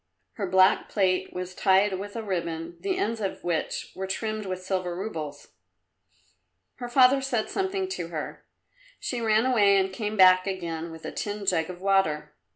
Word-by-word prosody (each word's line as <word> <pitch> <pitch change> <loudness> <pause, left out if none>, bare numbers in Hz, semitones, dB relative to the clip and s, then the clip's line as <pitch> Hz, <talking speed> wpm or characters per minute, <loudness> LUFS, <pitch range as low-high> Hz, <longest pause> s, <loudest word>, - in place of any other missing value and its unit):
Her 200 -4 -3
black 185 +1 +4
plait 185 -2 +1
was 180 0 -5
tied 190 +1 +3
with 205 +2 -7
a 230 - -3
ribbon, 170 -3 -3
the 380 -2 -1
ends 230 - -1
of 195 - -3
which 170 -2 -2
were 190 0 -5
trimmed 215 +1 -3
with 185 0 -4
silver 185 -2 -2
roubles. 160 -7 -6 1.3
Her 245 -1 -6
father 260 +2 +5
said 245 -5 -1
something 385 0 -1
to 370 - -4
her. - - -6 0.6
She 245 -2 -3
ran 220 +1 +3
away 205 -6 +4
and 190 0 +1
came 215 +1 -3
back 185 0 +6
again 170 -3 -4
with 160 0 -10
a - - -4
tin 205 -1 -4
jug 165 -3 +1
of 180 0 -8
water. 155 -7 +1
190 Hz, 170 wpm, -26 LUFS, 180-220 Hz, 1.3 s, back